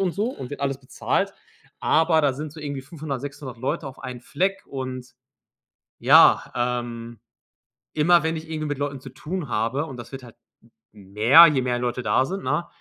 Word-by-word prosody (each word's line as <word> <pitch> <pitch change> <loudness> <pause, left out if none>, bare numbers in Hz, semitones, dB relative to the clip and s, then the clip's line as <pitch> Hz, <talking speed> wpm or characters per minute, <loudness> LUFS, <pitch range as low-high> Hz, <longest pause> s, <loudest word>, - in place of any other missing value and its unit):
und 185 -3 +1
so 205 +5 -1
und 130 - -8
wird 145 - -7
alles 135 -1 -1
bezahlt. 130 - -1 0.5
Aber 160 0 +3
da 145 -3 +2
sind 150 +2 -6
so 155 - -11
irgendwie 145 -2 -4
500, 145 -2 -6
600 140 -3 -8
Leute 145 +5 -3
auf 135 - -9
einen 125 -2 -7
Fleck 190 +9 -2
und 130 -2 -6 0.9
ja, - - +6
ähm, 120 -2 -3 0.8
immer 170 +3 +4
wenn 160 +1 -1
ich 160 0 -8
irgendwie 155 -1 -3
mit 145 -1 -3
Leuten 140 -1 -3
zu 130 0 -10
tun 155 +3 -5
habe, 115 +7 -1
und 135 - -9
das 120 +2 -10
wird 135 - -7
halt 120 -2 -14 0.6
mehr, 110 - +6
je 135 -4 +1
mehr 125 -1 -1
Leute 125 +1 -2
da 130 - +2
sind, 195 +1 -5
ne, 150 +6 -1
135 Hz, 185 wpm, -24 LUFS, 125-155 Hz, 0.9 s, ja